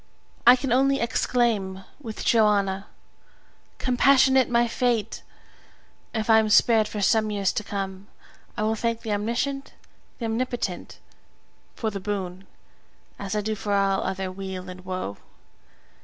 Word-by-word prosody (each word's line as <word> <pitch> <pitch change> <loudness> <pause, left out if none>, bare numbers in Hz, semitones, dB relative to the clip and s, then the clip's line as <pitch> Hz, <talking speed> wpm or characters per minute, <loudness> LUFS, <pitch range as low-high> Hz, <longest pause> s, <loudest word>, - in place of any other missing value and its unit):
I 245 - +10
can 260 -1 -3
only 275 +2 +3
exclaim 225 -5 0 0.2
with 225 -6 -7
Johanna, 200 -3 +2 0.9
"Compassionate 265 +1 +4
my 240 0 +3
fate!" 235 -2 -1 0.9
If 220 -2 -2
I 220 -1 +6
am 220 -1 +1
spared 220 0 +5
for 210 - -5
some 215 +1 +3
years 200 -2 0
to 210 - -2
come, 195 -1 -5 0.5
I 210 - -1
will 220 +1 +1
thank 230 +1 -2
the 215 - -2
Omniscient, 235 +7 -2 0.4
the 235 - -4
Omnipotent, 230 -4 -3 0.8
for 220 -2 -2
the 200 - -5
boon, 190 -2 -5 0.7
as 200 +1 -4
I 210 - +1
do 215 +1 -2
for 205 -1 -3
all 195 -1 +2
other 190 0 -3
weal 185 -1 -6
and 185 0 -12
woe. 185 - -4
215 Hz, 140 wpm, -25 LUFS, 195-235 Hz, 0.9 s, I